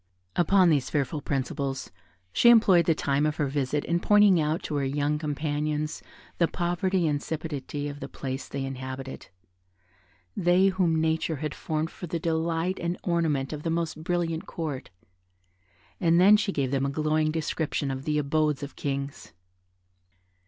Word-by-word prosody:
Upon 180 0 +4
these 140 -4 +1
fearful 145 +1 -1
principles, 135 0 -3 0.4
she 235 - +6
employed 200 -7 +6
the 165 - +4
time 140 -1 0
of 150 - -1
her 150 - 0
visit 140 +1 -1
in 170 +1 +1
pointing 205 -3 +5
out 155 +2 -1
to 150 - -2
her 140 - 0
young 145 +2 0
companions 150 0 -2 0.4
the 170 - +4
poverty 175 +1 0
and 150 -2 +1
insipidity 145 -2 -4
of 145 0 -7
the - - -7
place 130 -1 -5
they 135 -1 -4
inhabited; 130 0 -6 1.1
they, 180 +2 +4
whom 180 -4 +1
nature 160 0 0
had 150 +1 -4
formed 155 +1 -3
for 175 - -8
the 170 - -2
delight 165 +2 -1
and 170 +1 -2
ornament 160 -6 0
of 150 - -5
the 165 - -2
most 165 -1 -2
brilliant 170 -1 -1
Court; 150 -6 -5 1.1
and 170 0 +4
then 200 +4 +8
she 210 -1 +1
gave 135 -7 -1
them 135 0 +1
a - - -1
glowing 155 +2 +1
description 155 -2 -2
of 135 0 -5
the 150 -1 0
abodes 150 0 +1
of 140 - -7
kings. 140 0 -4
155 Hz, 160 wpm, -27 LUFS, 140-170 Hz, 1.1 s, then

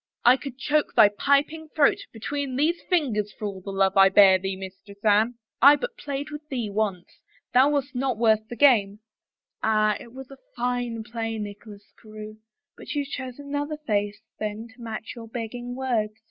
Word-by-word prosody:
I 245 +2 +8
could 265 -1 -8
choke 300 +2 0
thy 210 - +8
piping 285 +8 0
throat 295 -3 +4
be 225 - -12
tween 280 +2 -3
these 320 +6 +1
fingers, 240 - +1
for 215 - -5
all 195 -2 -5
the 195 - -8
love 195 0 +1
I 195 0 +7
bear 190 -1 +6
thee, 190 +1 -3
Mistress 195 +2 -10
Anne! 215 +3 +3 0.3
I 280 +4 +9
but 485 +9 -5
played 285 -2 -5
with 295 0 -6
thee 240 -6 -3
once 200 -4 -3
— - - -35
thou 260 +3 +6
wast 285 -2 -1
not 255 -2 -1
worth 220 -1 +2
the 240 - -7
game." 215 -6 +4 0.6
Ah, 215 -1 +2
it 235 - -12
was 265 +1 -11 0.2
fine 245 -2 -2
play, 225 0 -4
Nicholas 205 0 -9
Carewe 215 -1 -10 0.2
— - - -62
but - - -7
you 290 -1 0
chose 260 -2 -6
another 290 +1 -4
face 205 -7 -2 0.2
then 215 +2 -4
to 240 +2 -18
match 225 -1 -6
your 230 -1 -9
begging 245 +2 -6
words." 235 -5 -1
230 Hz, 190 wpm, -25 LUFS, 210-275 Hz, 0.6 s, I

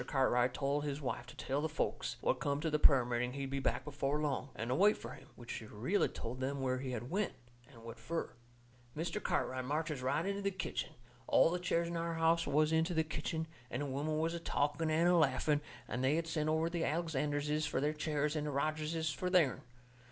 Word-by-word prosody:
Cartwright 125 -2 +3
told 140 +3 0
his 145 -1 -2
wife 125 -3 -3
to - - -11
tell 140 +2 -1
the 160 - -1
folks - - -2
what - - +1
come 140 0 0
to 160 +1 -1
the 150 - +2
prayer 135 -4 +6
meeting 125 +1 -1
he'd 135 -1 -4
be 135 - 0
back 125 -1 0
before 145 0 -1
long, 140 -3 -1
and 115 +2 -4
to - - +2
wait 205 +9 +5
fur - - -8
him. 135 - -12
Which 120 - -9
she 110 - -5
really 125 - +1
told 120 +3 -6
them 135 +2 -2
where 130 -1 0
he 130 0 -4
had 125 +1 -4
went, 200 +2 0 0.4
and 115 -5 -15
what 115 0 -8
fur. 165 0 -3 0.6
Mr. 175 +6 -2
Cartwright 130 0 0
marches 150 +1 -2
right 135 +6 0
into 200 +1 -1
the 200 - +1
kitchen. 190 -1 -4 0.3
All 165 - +5
the 180 - -1
chairs 170 -1 +1
in 170 0 -3
our 165 0 -2
house 165 +1 +3
was 150 +2 +3
into 160 +2 +2
the 160 - +3
kitchen, 160 +1 -3 0.2
and 145 - -2
the - - -2
women 145 +3 -1
was 165 +2 0
a 170 - -3
talking 145 0 0
and 160 +2 +3
a 180 - +5
laughing, 150 -1 +3 0.3
and 125 +2 -2
they 135 +3 +3
had 165 0 0
sent 155 -2 -1
over 160 +1 +2
to 170 0 -2
Alexanderses 150 -1 0
for 155 - 0
their 150 +2 +1
chairs 150 -1 -1
and 150 -1 -1
to 150 - -2
Rogerses 155 +2 -1
for 180 - -2
theirn. 175 -8 +3
150 Hz, 230 wpm, -35 LUFS, 135-165 Hz, 0.6 s, prayer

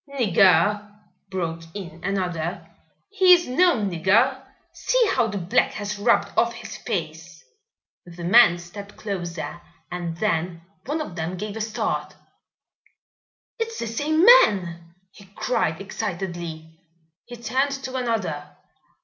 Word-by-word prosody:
"Nigger?" 205 -4 +3 0.3
broke 170 -3 -3
in 170 -5 -8
another. 180 -4 -3 0.4
"He 375 -3 +6
is 345 -1 -3
no 345 +8 +3
nigger. 210 +7 +1 0.3
See - - 0
how 230 - +2
the 205 -2 -4
black 180 -1 +1
has 205 0 -5
rubbed 205 - +2
off - - +2
his - - -8
face." - - -5 0.6
The 175 0 -10
men 175 -1 +6
stepped 200 +4 -11
closer 175 -5 -5 0.3
and 170 -2 -4
then 170 -4 -1 0.2
one 305 +3 -1
of 235 - -7
them 170 +2 -4
gave 210 +2 -5
a 220 - -4
start. 215 0 -3 1.4
"It's 455 0 -3
the - - -3
same 300 +9 +1
man!" 175 - +4 0.2
he 200 - -16
cried 225 -10 -1
excitedly. 170 -4 -6 0.5
He 240 - -9
turned 250 +4 0
to 260 0 -5
another. 195 - -3
200 Hz, 125 wpm, -23 LUFS, 170-240 Hz, 1.4 s, He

